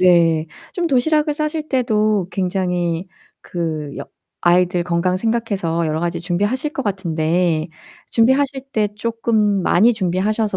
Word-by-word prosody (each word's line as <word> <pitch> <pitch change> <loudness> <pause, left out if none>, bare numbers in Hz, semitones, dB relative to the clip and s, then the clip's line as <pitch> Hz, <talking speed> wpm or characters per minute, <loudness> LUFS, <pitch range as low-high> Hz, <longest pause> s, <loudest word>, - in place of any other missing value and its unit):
네 165 -3 +4 0.3
좀 350 -2 -1
도시락을 300 +2 +2
싸실 305 0 -3
때도 215 -7 +1
굉장히 180 -2 -1 0.3
그 155 -4 -4
여 - - -5 0.4
아이들 175 0 +3
건강 180 +1 0
생각해서 200 -7 -1
여러 155 0 -1
가지 170 0 -1
준비하실 205 - -1
것 - - -3
같은데 170 -4 0 0.4
준비하실 265 +3 +2
때 210 -2 +1
쪼끔 220 -3 +1
많이 220 +9 +4
준비하셔서 205 +1 0
190 Hz, 285 characters per minute, -19 LUFS, 175-230 Hz, 0.4 s, 네